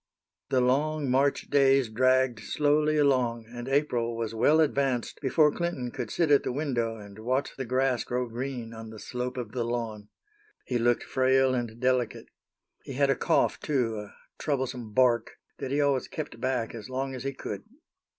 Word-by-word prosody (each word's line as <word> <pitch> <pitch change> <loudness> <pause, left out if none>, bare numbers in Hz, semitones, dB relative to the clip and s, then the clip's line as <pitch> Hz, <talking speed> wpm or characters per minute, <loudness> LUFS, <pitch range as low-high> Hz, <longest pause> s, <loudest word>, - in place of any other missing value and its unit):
The 130 - +3
long 140 +2 +1
March 140 +2 +1
days 135 -2 +4
dragged 130 +1 +2
slowly 150 +5 +1
along, 125 -5 +2
and 120 +1 -8
April 125 -5 0
was 115 -1 -3
well 145 +8 +4
advanced 135 -5 0
before 150 +2 +4
Clinton 155 -9 -3
could - - -5
sit 165 -4 +1
at 140 - +6
the - - -3
window, 125 -5 -1
and 100 -1 -11
watch 130 +5 -1
the 135 - -4
grass 130 0 +1
grow 125 0 -2
green 120 -1 -5
on 110 0 -8
the 110 - -10
slope 125 +3 -4
of 120 -4 -4
the 120 0 -2
lawn. 115 -3 -4 0.6
He 125 -2 -1
looked 120 +1 +2
frail 130 0 +3
and 120 -2 -3
delicate. 125 -2 0 0.5
He 135 - -7
had 140 +1 +3
a - - +2
cough, 165 - +1
too, 120 -7 0
a 105 -1 -10 0.2
troublesome 130 -6 -2
"bark," 120 -1 +2 0.2
that 135 - -4
he 140 +2 0
always 140 -3 +2
kept 155 -1 -6
back 125 -3 -1
as 115 0 -8
long 135 +1 -3
as 130 - -6
he 135 - -1
could. - - -6
130 Hz, 180 wpm, -28 LUFS, 120-140 Hz, 0.6 s, at